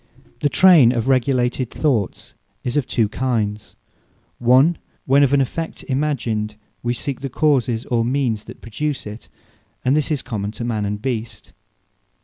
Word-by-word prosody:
Remembrance - - -29
The 145 - +2
Trayn 155 -11 +6
of 115 +2 -1
regulated 130 -1 +1
Thoughts 125 - -1 0.3
is 125 - -3
of 145 -3 +1
two 115 -3 +1
kinds; 110 -3 -2 0.6
One, 130 +8 +4 0.3
when 135 +2 +4
of 140 -2 +4
an 140 -1 +4
effect 160 +5 -4
imagined, 120 -7 -1 0.3
wee 120 0 -1
seek 135 +1 -4
the 135 - -4
causes, 125 -4 +1
or 115 -2 +1
means 120 -4 -1
that - - -12
produce 140 +6 -3
it: 105 +2 -9 0.6
and 130 +3 +3
this 150 -2 0
is 150 -4 -1
common 105 -4 -3
to 120 - -6
Man 110 -3 -1
and 105 +1 -3
Beast. 115 -2 -5
125 Hz, 160 wpm, -20 LUFS, 115-140 Hz, 0.6 s, Trayn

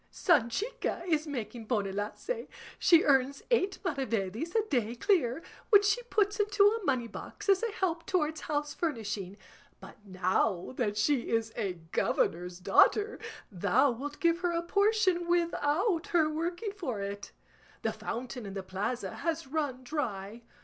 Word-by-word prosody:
Sanchica 345 - 0
is 315 -3 +1
making 240 -4 -5
bonelace; 210 - -2 0.3
she 335 -2 +6
earns 275 -1 +2
eight 395 -5 +2
maravedis 260 - -2
a 440 -1 +2
day 240 - 0
clear, 310 - +1 0.3
which 410 -2 +7
she 420 +4 +2
puts 415 -4 0
into 415 -1 +3
a 435 +1 +3
moneybox 250 - -3
as 390 -1 +4
a 465 -1 -1
help 340 -4 -2
towards 315 -5 0
house 295 -1 -2
furnishing; 210 - -3 0.4
but - - -14
now 185 +1 0
that 210 -5 -1
she 250 +3 +1
is 225 -1 0
a 200 -5 -1 0.2
governor's 175 +1 0
daughter 415 - +3 0.3
thou 255 +9 +3
wilt 285 +5 -6
give 335 0 +2
her 355 -1 0
a 335 0 -1
portion 400 -2 +2
without 340 +1 +1
her 330 -3 +3
working 345 +7 -2
for 315 - -4
it. 200 0 -5 0.5
The - - 0
fountain 245 -1 -5
in 195 - -7
the 195 - -4
plaza 200 +6 -3
has 330 -4 -2
run 270 -3 -2
dry. 230 -6 -4
290 Hz, 145 wpm, -30 LUFS, 225-360 Hz, 0.5 s, which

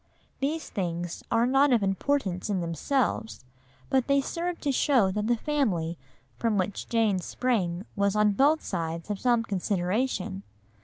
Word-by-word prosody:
These 300 +3 -2
things 175 -3 -3
are 230 +1 +3
not 270 +2 +4
of 235 -4 +3
importance 195 -1 0
in 195 -3 0
themselves, 175 - -1 0.4
but 265 -3 +1
they 280 0 +4
serve 340 +5 -3
to 285 - +1
show 250 -7 +3
that 210 +2 -2
the 240 - +3
family 215 - 0 0.4
from 225 -3 +1
which 190 +1 -2
Jane 220 -5 +2
sprang 190 -3 -1
was 200 -1 +1
on 210 0 +4
both 285 +9 +3
sides 165 +3 -3
of 200 - -3
some 240 -2 +2
consideration. 195 +1 -1
210 Hz, 150 wpm, -27 LUFS, 185-265 Hz, 0.4 s, not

